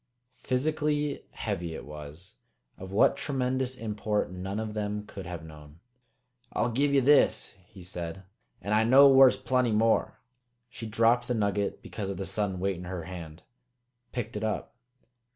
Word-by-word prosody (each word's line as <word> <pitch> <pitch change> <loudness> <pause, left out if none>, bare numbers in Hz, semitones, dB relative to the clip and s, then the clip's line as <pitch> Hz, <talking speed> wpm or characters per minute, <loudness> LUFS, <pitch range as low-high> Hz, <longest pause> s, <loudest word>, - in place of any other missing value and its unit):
Physically 150 +2 -1
heavy 85 -1 -4
it - - -8
was; 75 +5 -10 0.4
of 95 0 -9
what 105 +7 +4
tremendous 130 -2 -1
import 105 -4 -2
none 95 +2 -5 0.2
then 105 0 -3
could 95 -4 -9
have 85 -2 -6
known. 75 0 -13 0.7
"I'll 120 - 0
give 140 +5 +2
ye 140 -1 +4
this!" 130 -5 +4
he 95 - -13
said. 90 +1 -5 0.4
"An' 100 - -1
I 110 +1 +4
know 135 +5 +8
whar's 135 -1 +7
plenty 125 -2 +1
more." 110 +1 +2 0.5
She 120 -4 -6
dropped 115 +3 +3
the 125 - 0
nugget 100 -2 -1
because 100 -3 -5
of 100 - -4
the 95 - -4
sudden 95 -1 -1
weight 95 0 -1
in 90 - -8
her 90 -2 -5
hand; 85 -2 -9 0.7
picked 115 -3 -4
it 105 - -3
up. 110 -1 -2
105 Hz, 155 wpm, -28 LUFS, 90-125 Hz, 0.7 s, know